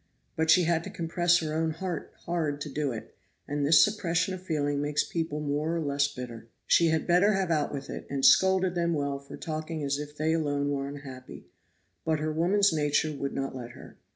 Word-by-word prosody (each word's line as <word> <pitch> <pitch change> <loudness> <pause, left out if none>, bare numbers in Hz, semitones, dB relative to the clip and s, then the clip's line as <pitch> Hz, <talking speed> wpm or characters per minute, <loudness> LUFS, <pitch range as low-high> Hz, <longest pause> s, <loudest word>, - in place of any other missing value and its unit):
But 160 0 0
she 175 +3 +6
had 165 0 +1
to - - -5
compress 175 +1 +2
her 155 -1 -3
own 160 +1 0
heart 165 0 -4
hard 160 -4 -1
to 150 - -4
do 145 0 -1
it; 110 -2 -8 0.3
and 145 0 -2
this 150 +2 +7
suppression 180 -3 -1
of 185 - -6
feeling 145 -5 -1
makes 145 0 +1
people 160 -3 -3
more 150 +3 -1
or - - 0
less 140 -2 +1
bitter. 120 -4 -8 0.2
She 170 - +4
had 160 -1 +1
better 185 +4 +4
have 190 -3 0
out 150 -3 +1
with 140 -1 -5
it, - - -7
and 135 -1 0
scolded 190 +5 +5
them 170 -1 0
well 140 -1 -2
for 140 - -11
talking 155 0 -4
as 140 0 -1
if 150 0 -8
they 155 +1 +1
alone 145 -3 0
were 140 -1 -2
unhappy; 135 -3 -9 0.6
but 160 -1 +1
her 155 +1 -2
woman's 185 +4 +3
nature 150 0 +1
would 140 0 -4
not 135 -1 -3
let 120 -2 -7
her. - - -13
155 Hz, 210 wpm, -28 LUFS, 145-170 Hz, 0.6 s, this